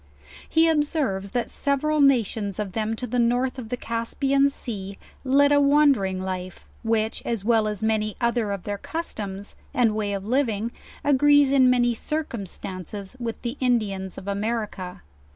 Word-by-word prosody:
He 325 0 +4
observes 295 - 0
that 240 +4 -2
several 295 +2 +1
nations 220 -7 +2
of 210 -3 -3
them 220 +2 -1
to 250 - -3
the 245 +1 -1
north 245 +3 +1
of 225 -3 -7
the 250 - -2
Caspian 270 +5 +1
soa, 200 -8 -6 0.3
led 280 +2 +4
a 285 0 +5
wandering 280 -10 +4
1 185 - -4
life; 185 -1 -5 0.2
which, 225 -1 0
as 225 -4 -3
well 225 -2 +3
as 210 0 -3
many 215 -1 0
other 235 -3 0
of 200 -3 -4
their 205 -1 -4
customs, 205 - -4 0.2
and 235 -3 +3
way 210 -1 -1
of 195 -1 -4
living, 230 -2 0 0.3
agrees 290 0 +5
in 260 -2 +5
many 240 -1 +3
circumstances 200 - -5
with 230 -2 -4
the 240 +3 -3
Indians 205 -7 0
of 190 - -9
America. 200 -3 -3
230 Hz, 160 wpm, -24 LUFS, 200-270 Hz, 0.3 s, a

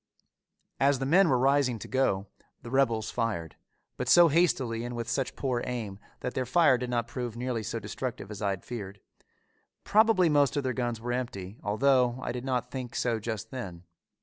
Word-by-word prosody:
As 140 0 +4
the 135 - -3
men 175 +5 +5
were 130 - +4
rising 135 -1 +2
to - - -9
go, 115 -7 +1 0.4
the 120 - -8
rebels 115 -5 +1
fired, 110 -9 -2 0.4
but 125 - -2
so 175 +2 +8
hastily 135 -8 +1
and 120 0 -5
with 120 0 -4
such 125 +2 -2
poor 125 -3 -1
aim 110 -6 -4 0.2
that 125 - -3
their 130 -1 -2
fire 150 0 +5
did 125 0 -4
not 120 -1 -1
prove 120 -2 -5
nearly 125 -2 -2
so 110 - -4
destructive 110 0 -5
as 105 - -7
I 100 - +1
had 95 -2 -4
feared. 100 -4 -7 0.8
Probably 215 -4 +4
most 145 -2 +3
of 145 - 0
their 130 -1 -1
guns 120 -2 -2
were 120 +2 -3
empty, 110 -5 -5
although 125 +3 +2
I - - -2
did 125 +1 -5
not 125 -2 -1
think 125 -3 -6
so 115 -2 0
just 110 -1 -5
then. 95 -10 -7
125 Hz, 195 wpm, -28 LUFS, 115-135 Hz, 0.8 s, so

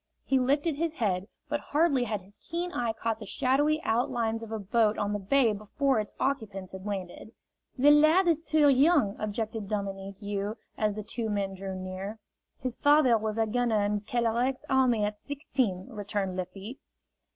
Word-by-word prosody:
He 270 - +3
lifted 285 +4 +1
his 325 0 -1
head, 195 - -1 0.2
but 295 0 -1
hardly 290 -5 +2
had 210 -3 -2
his 195 +3 -16
keen 345 +2 -4
eye 240 -8 -1
caught 225 0 -3
the 215 - -7
shadowy 285 +7 +2
outlines 230 -2 0
of 225 -1 -8
a 220 - -2
boat 215 +1 +1
on 205 0 -1
the 205 - -1
bay 230 +3 +3
before 225 +5 0
its 210 - -4
occupants 210 -9 -2
had 190 +1 -8
landed. 195 +2 -5 0.4
"The 285 +3 +6
lad 310 +5 +5
is 325 -2 +3
too 310 -2 +3
young," 275 - +4
objected 215 0 -3
Dominique 195 -1 -4
You, 205 +1 -3 0.2
as 210 -1 0
the 215 - -5
two 225 +1 -4
men 200 -2 -1
drew 190 0 -6
near. 185 +3 -5 0.4
"His 255 -2 -4
father 290 -4 +5
was 220 0 -2
a 225 - +3
gunner 225 -1 +1
in 205 0 0
Kelerec's 240 +4 0
army 255 -5 +3
at 210 0 -3
sixteen," 260 - -2
returned 205 -3 -3
Lafitte. 195 +7 -6
225 Hz, 175 wpm, -29 LUFS, 205-270 Hz, 0.4 s, The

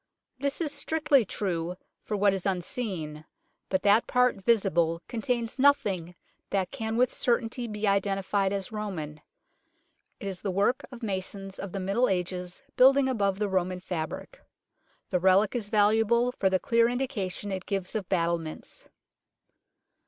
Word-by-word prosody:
This 280 +1 -2
is 305 -3 0
strictly 295 -3 +2
true 180 -4 -2 0.3
for 210 - -3
what 200 0 +4
is 190 -2 -3
unseen, 180 -5 -3 0.5
but 190 - 0
that 205 +3 +4
part 250 -5 +2
visible 175 -7 +2
contains 235 +1 -2
nothing 195 - +2 0.3
that 190 -2 -1
can 220 0 -3
with 250 0 +3
certainty 240 0 0
be 210 -1 -3
identified 195 0 +1
as 200 0 -3
Roman. 170 -9 -5 1.0
It - - -7
is 190 -3 -3
the 200 - -2
work 200 +7 +1
of 245 -2 -10
masons 195 -1 -4
of 195 - -5
the 195 - -4
Middle 200 +7 +1
Ages 180 +2 -3
building 270 +1 +6
above 200 -7 +1
the 210 0 0
Roman 185 -1 -1
fabric. 180 - -5 0.7
The 180 - +2
relic 190 +5 +4
is 215 -4 -2
valuable 225 +3 +3
for 195 -6 +1
the 190 - +3
clear 230 +3 +3
indication 225 -6 -2
it 190 -1 -4
gives 195 -3 -2
of 210 -5 -3
battlements. 170 -3 -2
200 Hz, 145 wpm, -28 LUFS, 185-235 Hz, 1.0 s, building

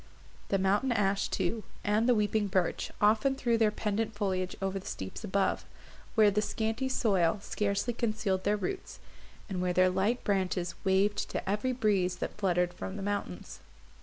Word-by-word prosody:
The 195 - +1
mountain 200 +7 +2
ash 200 -3 +1
too, 205 +4 -1 0.2
and 215 +4 +2
the 245 - +5
weeping 210 0 +1
birch, 185 -3 0
often 215 +6 +3
threw 240 -3 +1
their 225 -1 +4
pendant 215 +1 -2
foliage 185 -3 -1
over 195 0 -2
the 190 - -11
steeps 95 - -6
above, 200 -1 0 0.5
where 215 -3 +6
the 210 +2 +1
scanty 225 +4 -1
soil 195 -7 +2
scarcely 210 +3 -1
concealed 215 -5 -1
their 205 +1 +2
roots, 380 - -4 0.5
and 185 -3 -3
where 180 0 0
their 185 0 +4
light 200 +7 0
branches 185 -3 0
waved 200 +1 +2
to - - -4
every 210 +6 0
breeze 200 -7 +1
that - - -5
fluttered 180 -3 +1
from 190 +2 -6
the 200 - -5
mountains. 195 - -4
205 Hz, 165 wpm, -30 LUFS, 190-220 Hz, 0.5 s, where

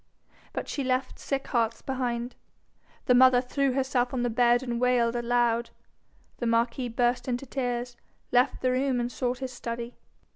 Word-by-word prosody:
But - - -4
she 280 - -3
left 255 0 -1
sick 275 -1 -2
hearts 230 -2 0
behind. 245 -2 -2 0.7
The 250 - +4
mother 255 0 +7
threw 265 +1 0
herself 260 -1 0
on 245 - 0
the 245 - 0
bed, 240 +2 +3
and 240 -2 -3
wailed 245 -2 +2
aloud. 240 -1 +1 0.7
The 240 - -1
marquis 235 +2 +1
burst 240 +2 0
into 245 +1 -2
tears, 245 -2 -3 0.4
left 250 +3 +2
the 255 - +3
room, 255 0 +1
and 240 0 -2
sought 250 -1 -2
his 260 0 -5
study. 235 0 -5
245 Hz, 160 wpm, -27 LUFS, 240-255 Hz, 0.7 s, mother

